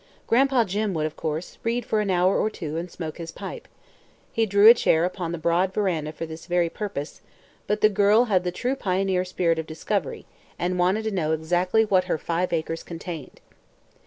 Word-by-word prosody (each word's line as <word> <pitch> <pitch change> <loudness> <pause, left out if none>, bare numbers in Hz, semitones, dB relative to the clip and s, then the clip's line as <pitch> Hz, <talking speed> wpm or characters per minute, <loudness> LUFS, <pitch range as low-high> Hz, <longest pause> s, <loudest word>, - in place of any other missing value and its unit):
Gran'pa 260 0 +3
Jim 205 0 -1
would, 155 -1 0
of 155 - -4
course, 160 +2 -4
read 235 +1 -1
for 215 - +1
an 205 - -2
hour 185 +1 +3
or 215 - +1
two 160 -7 -6
and 170 +2 -4
smoke 160 -2 -7
his 165 -1 -6
pipe; - - -8 0.6
he 225 -1 +1
drew 200 +1 +5
a 230 - +12
chair 165 -8 +2
upon 180 -2 -3
the 170 - -3
broad 170 +3 +1
veranda 170 -7 0
for 165 - -6
this 160 +1 -10
very 175 -2 +1
purpose; 195 -9 -5 0.5
but 210 +1 0
the - - +7
girl 205 +2 +4
had 190 -6 +2
the 180 - -1
true 250 +8 -2
pioneer 190 -4 0
spirit 175 -3 0
of 160 - -5
discovery 160 +1 -3 0.3
and 180 +1 -1
wanted 185 +5 +2
to 220 - -2
know 160 -5 0
exactly 175 +7 +1
what 185 -3 +2
her 180 - 0
five 170 +3 -2
acres 165 0 -2
contained. 165 -4 -8
180 Hz, 200 wpm, -25 LUFS, 165-205 Hz, 0.6 s, a